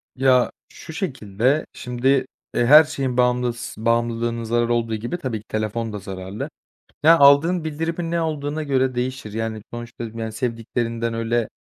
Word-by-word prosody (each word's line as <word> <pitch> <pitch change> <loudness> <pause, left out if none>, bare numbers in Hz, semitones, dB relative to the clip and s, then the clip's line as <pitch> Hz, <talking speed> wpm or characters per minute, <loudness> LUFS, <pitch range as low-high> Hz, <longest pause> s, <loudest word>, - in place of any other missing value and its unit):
Ya, 130 -1 +3 0.2
şu 160 - -11
şekilde, 130 - 0
şimdi, 125 +1 -3 0.5
eee, 120 - +3
her 150 +5 +9
şeyin 135 -5 -3
bağımlıs 125 -1 0
bağımlılığının 115 +1 0
zarar 120 +1 +1
olduğu 115 -1 0
gibi 120 +10 -4
tabii 130 -9 -3
ki 105 - -18
telefon 110 +1 -2
da 105 - -4
zararlı. 95 +2 -6 0.5
Ya, 165 +2 +8
aldığın 155 +5 +5
bildirimin 165 +2 -3
ne 170 - +1
olduğuna 155 -1 -2
göre 130 -3 +1
değişir. 125 -3 -3
Yani, 110 -1 -3
sonuçta, 120 0 -7
yani, 115 0 -5
sevdiklerinden 115 0 -2
öyle, 115 0 0
120 Hz, 150 wpm, -22 LUFS, 115-140 Hz, 0.5 s, her